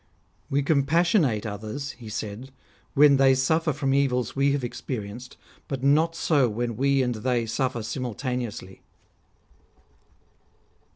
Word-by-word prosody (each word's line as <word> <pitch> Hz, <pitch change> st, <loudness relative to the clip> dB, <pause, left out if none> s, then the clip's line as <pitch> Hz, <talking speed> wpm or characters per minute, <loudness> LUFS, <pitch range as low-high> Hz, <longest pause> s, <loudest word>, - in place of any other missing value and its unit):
" -, -, -40 dB
We 140 Hz, -, +2 dB
compassionate 150 Hz, -, +2 dB
others," 110 Hz, +7 st, -5 dB
he 115 Hz, -3 st, -11 dB
said, 105 Hz, +4 st, -6 dB, 0.2 s
" -, -, -35 dB
when 145 Hz, -1 st, +6 dB
they 135 Hz, -1 st, +5 dB
suffer 160 Hz, +5 st, +1 dB
from 135 Hz, -1 st, -1 dB
evils 125 Hz, -4 st, +1 dB
we 140 Hz, +1 st, +2 dB
have 140 Hz, -2 st, -2 dB
experienced; 120 Hz, 0 st, -6 dB, 0.3 s
but 135 Hz, -2 st, -4 dB
not 155 Hz, +4 st, +3 dB
so 145 Hz, -7 st, +2 dB
when 115 Hz, +2 st, -3 dB
we 135 Hz, +2 st, +2 dB
and 125 Hz, -1 st, 0 dB
they 120 Hz, +2 st, -1 dB
suff'er 120 Hz, +1 st, -2 dB
simultaneously." 120 Hz, -4 st, -4 dB
130 Hz, 130 wpm, -25 LUFS, 115-140 Hz, 0.3 s, when